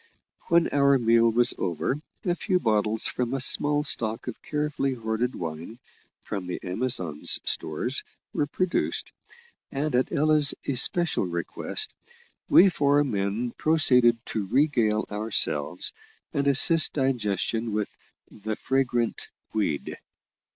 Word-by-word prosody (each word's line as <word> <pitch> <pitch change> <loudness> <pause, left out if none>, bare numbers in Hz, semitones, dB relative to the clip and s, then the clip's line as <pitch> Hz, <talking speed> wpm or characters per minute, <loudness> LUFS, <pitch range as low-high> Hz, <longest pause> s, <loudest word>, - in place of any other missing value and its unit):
When 170 0 +3
our 140 -1 +3
meal 115 -1 +3
was 120 +2 +2
over, 85 - -2 0.3
a 175 - +1
few 185 +1 -1
bottles 110 -3 0
from 125 +1 -2
a - - -2
small 145 +3 +2
stock 115 -4 -2
of 125 - -7
carefully 150 -3 -2
hoarded 115 +1 -3
wine, 85 +6 -7 0.5
from 95 -3 -6
the 90 - -5
Amazon's 90 - -2
stores, - - -1 0.3
were 145 - -1
produced, 185 +4 -2 0.6
and 145 +1 -3
at 125 +1 0
Ella's 150 -1 +4
especial 140 - +3
request, 85 - -4 0.6
we 195 - +7
four 145 -3 +2
men 110 -1 -2
proceeded 125 -7 +3
to 105 -3 -4
regale 115 -4 +1
ourselves, 90 -6 0 0.4
and 140 0 -1
assist 155 +4 +7
digestion 115 - -1
with 105 -1 -3 0.4
"the 110 +1 -5
fragrant 120 -3 -1 0.3
weed." 100 -9 -2
120 Hz, 120 wpm, -25 LUFS, 105-145 Hz, 0.6 s, we